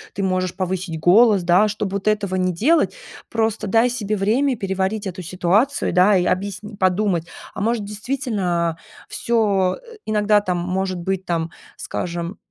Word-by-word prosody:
ты 195 - -2
можешь 185 -1 -1
повысить 185 -3 -3
голос, 200 +2 +5
да. 180 +5 +4
Чтоб 210 -1 -3
вот 200 +1 -3
этого 205 -3 +1
не 185 0 +1
делать, 295 - +2 0.3
просто 220 -2 -1
дай 225 +5 +4
себе 215 -4 -2
время 245 +7 +1
переварить 195 +1 -2
эту 185 0 -5
ситуацию, 185 - +1
да. 190 +2 +5
И 180 - +1
объясни 200 +3 -2
подумать: 185 -3 +1 0.3
а - - -5
может, 225 -1 0
действительно, 205 - -2 0.3
всё, 200 -6 +1
э, 470 -2 -15
иногда 210 -1 +3
там 180 -3 -1
может 185 +1 -2
быть, 190 +1 -2
там, 165 -1 -2 0.3
скажем, 170 +2 -4
195 Hz, 155 wpm, -21 LUFS, 180-215 Hz, 0.3 s, голос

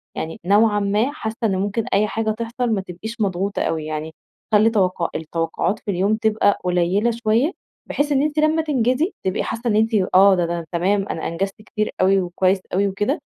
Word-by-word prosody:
يعني 160 - -5
نوعًا 210 +2 +4
ما 205 +6 +1
حاسّة 220 -6 -5
إن 205 -4 +2
ممكن 205 +3 -1
أي 210 +2 +3
حاجة 220 0 -1
تحصل 230 +2 -3
ما 200 - 0
تبقيش 215 +6 -8
مضغوطة 195 0 -1
أوي 160 -1 -1
يعني، 155 0 -4 0.4
خلّي 215 +2 +6
توقّع 185 -5 0
التوقعات 165 +5 -2
في 205 - -4
اليوم 195 +4 +1
تبقى 215 -2 +2
قليلة 180 +5 +1
شويّة 230 +6 +1 0.4
بحيث 290 +1 0
إن 275 -1 +3
أنتِ 300 +1 0
لمّا 310 +1 +3
تنجزي 280 - 0
تبقي 190 0 -1
حاسّة 235 +2 -4
إن 210 - +1
أنتِ 220 +2 +2 0.2
آه، 195 +1 +7
ده 175 -2 +1
ده 170 0 -3
تمام 195 +3 +1
أنا 160 - -3
أنجزت 195 +5 -3
كتير 215 0 -3
أوي 190 +1 +4
وكويّس 185 +2 +1
أوي 200 +2 +2
وكده، 205 +9 -1
205 Hz, 190 wpm, -21 LUFS, 185-225 Hz, 0.4 s, آه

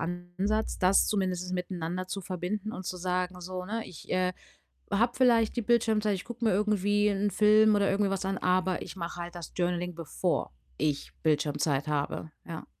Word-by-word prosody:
Ansatz, 175 +5 -2
das 185 +1 +4
zumindest 185 -3 -1
miteinander 180 0 -3
zu 195 - -3
verbinden 190 +4 -3
und 185 - -6
zu 185 - -3
sagen 180 0 -2
so, 185 +1 -5
ne: 225 +4 -3
„Ich, 160 - -12
äh, 185 0 +2 0.6
habe 235 +4 +3
vielleicht 235 -4 +4
die - - +2
Bildschirmzeit, 215 -3 +2
ich 180 - -7
gucke 240 0 -7
mir 220 - +4
irgendwie 205 +1 +2
'n 205 0 0
Film 215 +1 +5
oder 200 -1 +3
irgendwie 200 0 +2
was 195 -1 -2
an, 195 0 -1
aber 185 0 +1
ich - - -9
mache 175 -1 -5
halt 175 +1 -7
das 170 -3 -8
Journaling 175 0 -1
bevor 165 - -1 0.3
ich 145 -2 -1
Bildschirmzeit 150 -2 +1
habe“, 150 +1 -2 0.2
ja. 165 -2 -6
185 Hz, 180 wpm, -29 LUFS, 175-210 Hz, 0.6 s, Film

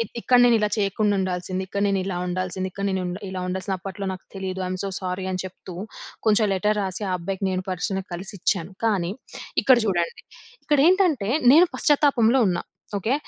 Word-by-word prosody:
ఇ - - +4 0.2
ఇక్కడ 250 +1 +4
నేను 240 -1 +5
ఇలా 210 -1 +1
చెయ్యకుండా 205 0 +1
ఉండాల్సింది. 185 0 -2
ఇక్కడ 200 +1 -3
నేను 195 -1 +1
ఇలా 190 -2 -3
ఉండాల్సింది. 185 +1 -2
ఇక్కడ 200 +2 -5
నేను 190 -1 -1
ఉండ్ 180 +1 -4
ఇలా 185 -1 -4
ఉండసలు 190 +1 -2
అప్పట్లో 195 +2 -7
నాకు 185 - -9
తెలీదు. 190 -1 -4
ఐ‌మ్ 185 0 -3
సో 200 - -2
సారీ 185 0 -4
అని 185 -1 -2
చెప్తూ, 185 -1 -9 0.5
కొంచెం 215 0 +4
లెటర్ 210 +3 +1
రాసి 190 +1 -2
ఆ - - 0
అబ్బాయికి 190 +3 -4
నేను 185 0 -1
పర్సనల్లీ 190 +1 -2
కలిసి 190 +3 -6
ఇచ్చాను. 180 0 0
కానీ 190 -6 +1 0.5
ఇక్కడ 260 -2 +6
చూడండి. 175 -4 -1 0.4
ఇక్కడ 295 - +2
ఏంటంటే 350 - +2 0.2
నేను 335 +5 +7
పశ్చాత్తాపంలో 270 -5 +3
ఉన్నా. 175 - -1 0.4
ఓకే. 225 +7 0
190 Hz, 185 wpm, -24 LUFS, 185-215 Hz, 0.5 s, నేను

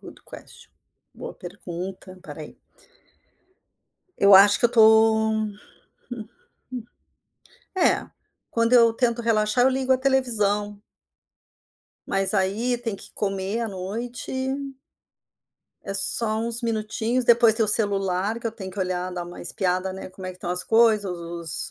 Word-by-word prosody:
Good - - -14
question. - - -14 0.4
Boa - - -9
pergunta, 185 +1 -9
pera - - -11
aí. - - -13 1.6
Eu 200 0 +6
acho 200 +1 +6
que - - -4
eu 240 - +5
tô 220 -1 +5
hum 215 -1 -3 0.6
hum, 225 -3 -8 1.5
é, 365 - +1 0.4
quando 230 +1 -1
eu 230 -2 +5
tento 235 0 -1
relaxar, 220 +1 +1
eu 265 - +3
ligo 260 0 -1
a 255 - +1
televisão. 210 -6 +1 1.3
Mas 195 -1 +1
aí 210 +6 0
tem 230 -3 -5
que - - -10
comer 195 +2 -3
à 230 - -3
noite 210 +6 -7 1.5
é 195 - -6
só 215 +2 +5
uns 230 +1 +4
minutinhos, 225 +2 -2
depois 235 -2 +4
tem 225 - +1
o 215 - -2
celular 200 -1 0
que 235 - -6
eu 225 - -4
tenho 195 -4 -9
que 195 - -11
olhar, 185 -1 -3
dar 175 -1 -6
uma 175 - -11
espiada, 185 +1 -2
né, 190 - -9
como 185 0 -10
é 185 - -6
que 180 - -15
tão 175 - -6
as 180 0 +2
coisas, 225 -2 +3
os 170 -2 -3
210 Hz, 145 wpm, -23 LUFS, 190-230 Hz, 1.6 s, Eu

